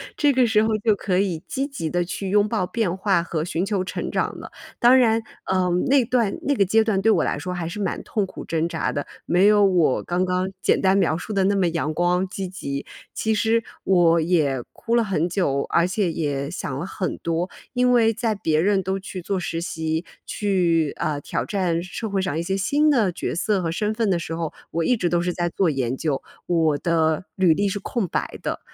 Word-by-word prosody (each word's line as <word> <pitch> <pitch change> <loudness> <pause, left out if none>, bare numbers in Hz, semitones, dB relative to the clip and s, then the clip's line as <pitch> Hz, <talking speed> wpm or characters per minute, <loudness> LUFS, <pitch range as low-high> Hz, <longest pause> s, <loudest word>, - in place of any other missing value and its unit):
这 290 -2 +3
个 255 -2 +3
时 220 -2 +3
候 220 - +1
就 215 -3 +4
可 190 -2 -1
以 185 -5 0
积 270 - -2
极 275 - -4
地 175 +2 0
去 190 +2 -4
拥 205 +1 +3
抱 210 -5 -1
变 200 -6 -1
化 190 -3 +1
和 160 -2 -2
寻 170 +2 -2
求 200 -2 -1
成 - - -4
长 - - -1
了。 - - -10 0.3
当 245 +2 +6
然， 225 -2 +3 0.2
呃， 185 -1 +1 0.2
那 265 -2 +4
段 235 -4 +1
那 285 - +1
个 205 - +4
阶 220 +4 +3
段 210 -3 0
对 220 +2 +4
我 - - +3
来 - - -1
说 180 - -4
还 175 -2 -3
是 170 +5 -6
蛮 195 - -2
痛 210 - -1
苦 - - -9
挣 165 +1 -1
扎 160 - -1
的， 145 - -4 0.2
没 180 +4 +4
有 210 -1 +5
我 175 -8 +2
刚 175 +1 0
刚 185 0 0
简 - - +3
单 190 0 +3
描 160 -5 +2
述 210 +5 -6
的 195 - +2
那 200 - +2
么 190 -3 +2
阳 160 -2 -1
光 175 +3 +1
积 190 0 -5
极。 140 -7 -5 0.3
其 220 0 0
实 225 +2 +2 0.2
我 170 -3 +4
也 155 -7 +1
哭 235 0 -2
了 235 - +4
很 180 -6 0
久， 165 -7 0
而 170 +1 +3
且 190 -2 0
也 145 -3 -2
想 130 - -4
了 170 - -4
很 190 -1 -3
多。 170 +2 -2 0.2
因 250 0 +3
为 225 -2 +4
在 225 -1 -1
别 160 -5 +1
人 195 0 +2
都 190 +1 -2
去 190 -1 -7
做 195 +2 -2
实 165 -2 -3
习， 160 0 -3 0.2
去， 175 -7 +1
呃， 150 -2 -1
挑 - - -2
战 180 -5 0
社 215 +4 -5
会 195 -1 0
上 180 -5 -2
一 - - 0
些 190 +3 -1
新 285 +11 +2
的 225 -10 +3
角 - - -4
色 195 +2 +1
和 165 -1 -1
身 210 +5 -1
份 220 -2 0
的 180 - +2
时 165 - -5
候， 165 -2 -3 0.2
我 165 0 -1
一 250 - +3
直 180 -6 0
都 170 0 +1
是 175 0 -1
在 175 -1 -1
做 185 0 +1
研 130 -3 -1
究。 150 -4 -1 0.3
我 160 -4 +2
的 160 +1 +1
履 185 -4 +4
历 200 +5 0
是 195 - -2
空 210 -2 -2
白 - - -3
的， - - -3
185 Hz, 250 characters per minute, -23 LUFS, 165-210 Hz, 0.3 s, 当